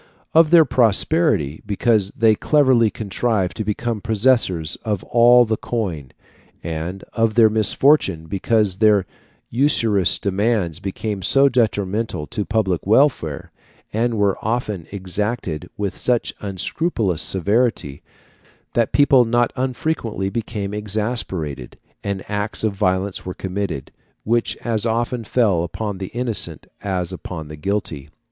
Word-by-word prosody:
Of 160 -1 +6
their 165 -1 +7
prosperity, 120 - +2
because 105 -1 +1
they 110 -1 +5
cleverly 130 -2 +3
contrived 100 -3 -1
to 110 - -2
become 105 +1 -2
possessors 110 -8 +1
of 105 -4 -3
all 120 +1 +5
the 110 -1 -1
coin; 90 - -3 0.5
and 85 +4 -5
of 115 -1 +1
their 110 -2 +6
misfortune, 110 - +2
because 100 +2 0
their 105 -3 +4 0.5
usurious 115 - +2
demands 100 -4 0
became 100 +1 -4
so 135 +9 +4
detrimental 105 - -1
to 90 - -4
the - - -4
public 95 -6 0
welfare, 110 - +2 0.4
and 115 +2 0
were 100 -2 +1
often 110 -6 -2
exacted 95 -3 -3
with 100 -2 -2
such 125 -2 0
unscrupulous 100 - -2
severity, 95 - 0 0.7
that 115 -2 +1
people 140 -3 +5
not 120 +1 +1
unfrequently 125 -6 -2
became 105 -3 -4
exasperated, 105 - -3 0.3
and 100 -1 -3
acts 105 +1 -2
of 110 -2 +1
violence 95 -1 -1
were 90 - -6
committed, 95 -7 -4 0.3
which 115 +1 0
as 115 -3 0
often 115 +1 -1
fell 105 -6 +2
upon 100 +3 -4
the 95 - -4
innocent 120 -1 -3 0.2
as 95 -2 -3
upon 80 -4 -7
the 75 - -7
guilty. 75 -4 -3
105 Hz, 125 wpm, -20 LUFS, 95-120 Hz, 0.7 s, their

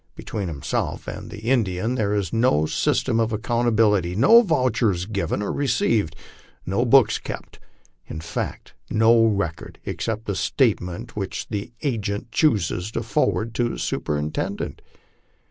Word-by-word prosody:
Between 100 -3 -4
himself 75 -5 -3
and - - -6
the 105 - -9
Indian 110 -3 +1
there 105 -4 0
is 100 -5 -2
no 115 -10 +3
system 115 +7 +1
of 115 0 +1
accountability, 110 -5 +2
no 180 - +7
vouchers 120 - +1
given 105 0 -2
or - - -2
received, 115 - +1 0.5
no 100 +7 0
books 130 -1 +5
kept, - - -8 0.5
in 80 - -6
fact 80 - -5 0.2
no 115 +1 +5
record 95 -7 -2
except 110 0 -3
the 100 - -1
statement 110 -2 0
which 95 -3 -4
the 105 +1 -4
agent 110 -4 -2
chooses 100 - +1
to - - -2
forward 115 +1 0
to 120 +1 0
his - - -4
superintendent. 75 +1 -3
110 Hz, 135 wpm, -23 LUFS, 95-120 Hz, 0.5 s, no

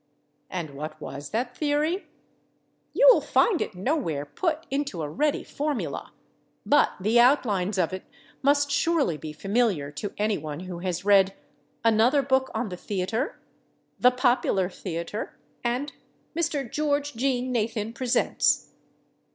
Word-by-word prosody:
And 170 -5 -4
what 150 +3 -7
was 140 -1 -7
that 245 +3 -2
theory? 305 +5 0 0.8
You - - +5
will - - +4
find 390 -8 +2
it - - -3
nowhere 185 - -1
put 320 - -2
into 275 - -2
a - - -2
ready 295 - 0
formula, 295 -2 -3 0.5
but 290 - +4
the 215 +5 +3
outlines 215 -7 +3
of 180 -1 +1
it 185 - -6 0.4
must 285 +1 +3
surely 320 - +2
be 155 0 -7
familiar 195 -4 0
to 200 +7 -5
any 210 0 +1
one 150 +1 -6
who 185 -2 -6
has 180 0 -3
read 195 -1 +5 0.5
"Another 230 +5 +4
Book 265 0 +2
on 225 -1 -1
the 180 - -6
Theater," 205 - -2 0.6
"The 250 - +7
Popular 245 -7 +1
Theater" 175 +3 -5 0.3
and 250 +4 -1 0.4
"Mr. 315 -5 -1
George 290 +2 -1
Jean 255 +1 0
Nathan 225 -1 -1
Presents." 245 0 +1
230 Hz, 135 wpm, -26 LUFS, 185-280 Hz, 0.8 s, The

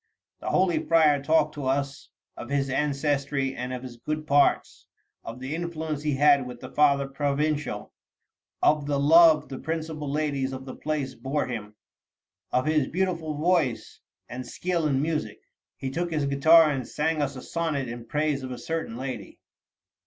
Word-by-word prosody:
The - - -4
holy 185 -2 +2
friar 155 -4 +4
talked 155 +1 +2
to 145 -3 -4
us 140 +1 -2 0.3
of 120 - -8
his 140 -1 0
ancestry, 140 -1 0
of 125 +1 -5
his 125 -2 -9
good 155 +5 -4
parts, 145 -1 +2 0.4
of 115 +2 -8
the 130 +3 -5
influence 160 -3 -3
he 150 -2 0
had 140 -2 +4
with 125 -1 -9
the 130 +1 -9
Father 140 -2 +3
Provincial, 145 -4 -2 0.7
of 150 -1 +3
the 145 -1 0
love 155 +1 +6
the 135 - -7
principal 160 -2 -4
ladies 140 -3 -1
of 130 0 -7
the 130 - -7
place 150 -3 -3
bore 135 +5 -2
him, 105 -4 -6 0.8
of 125 - +1
his 155 -3 +2
beautiful 170 -4 -2
voice 155 -7 0 0.3
and 130 +1 -6
skill 170 +2 -1
in 135 -1 +1
music. 155 -1 -2 0.4
He 130 - -4
took 175 +5 -2
his 150 -3 0
guitar 155 +3 +6
and 130 -4 -3
sang 155 0 -1
us 140 -1 -2
a 130 - -7
sonnet 155 -6 -2
in 120 0 -8
praise 150 0 0
of 130 - -6
a 125 - -5
certain 160 -3 -4
lady." 130 0 -6
145 Hz, 165 wpm, -26 LUFS, 135-155 Hz, 0.8 s, love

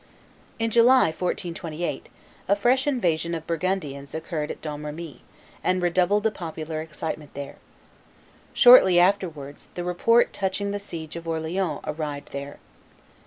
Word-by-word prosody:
In 225 0 -1
July, 240 -1 +6
1428, 170 -2 -4 0.4
a 200 - +4
fresh 255 +6 +2
invasion 170 - 0
of 160 -1 -6
Burgundians 160 -5 -3
occurred 160 -1 -3
at - - -6
Domremy, 150 0 -7 0.4
and 185 - +2
redoubled 180 +3 +2
the 220 - +2
popular 160 -3 -5
excitement 155 -1 -6
there. 140 0 -7 0.9
Shortly 245 -8 +8
afterwards, 175 -7 0
the 175 - -3
report 230 +7 +3
touching 200 +1 -2
the 205 - -3
siege 165 -6 -7
of 170 0 -7
Orleans 160 0 -2
arrived 150 -2 -5
there. 140 +1 -6
170 Hz, 125 wpm, -25 LUFS, 155-195 Hz, 0.9 s, Shortly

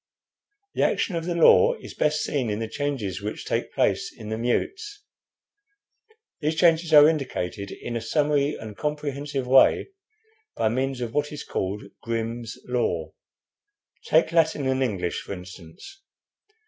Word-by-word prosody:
The - - -1
action 185 - +1
of 165 -1 -3
the 175 -1 -2
law 465 - +6
is - - -11
best 150 0 +1
seen 130 -6 -1
in 105 - -1
the 115 0 -3
changes 115 -7 -3
which 105 +1 -5
take - - -2
place - - 0
in 110 - -10
the 110 - -2
mutes. 395 - -2 1.4
These 155 0 -1
changes 165 -1 +3
are 150 -1 +9
indicated 110 - -2
in 120 - -6
a 115 - -2
summary 145 +3 +1
and 110 -2 -9
comprehensive 145 -2 -3
way 130 - +5 0.7
by 110 - +1
means 130 +2 -2
of 115 -2 -4
what 150 0 0
is 150 - -6
called 95 +2 -3 0.2
'Grimm's 115 0 -4
Law.' 125 -1 -1 0.9
Take 160 +1 +3
Latin 160 -4 +2
and 130 0 +1
English, 95 -9 -1
for - - -7
instance. 90 - -11
135 Hz, 150 wpm, -25 LUFS, 110-155 Hz, 1.4 s, are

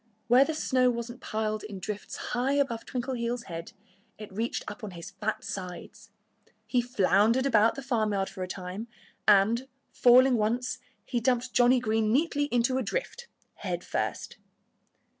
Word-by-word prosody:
Where 250 +4 +6
the 320 - -3
snow 255 -4 +2
wasn't 235 0 -4
piled 215 0 -2
in 210 -2 -7
drifts 205 +2 -5 0.2
high 250 +3 +1
above 270 -5 0
Twinkleheels' 245 -1 -2
head 165 -4 -7 0.4
it 210 -2 -10
reached 225 +4 -2
up 210 +2 -8
on 210 - -4
his 170 - -8
fat 210 +3 -3
sides. 190 +4 -7 0.6
He 245 +3 +1
floundered 230 +1 +3
about 225 -4 +4
the 275 - -6
farmyard 215 -6 0
for 185 - -8
a 185 - -2
time. 185 +4 -6 0.4
And, 215 +5 +4 0.2
falling 250 +1 +6
once, 235 +4 -1 0.3
he 245 - -1
dumped 245 +1 0
Johnnie 245 +1 +5
Green 220 -2 +1
neatly 290 +2 +2
into 255 -1 +1
a - - 0
drift, 485 - -4 0.3
head - - -4
first. - - -3
235 Hz, 155 wpm, -28 LUFS, 210-255 Hz, 0.6 s, Where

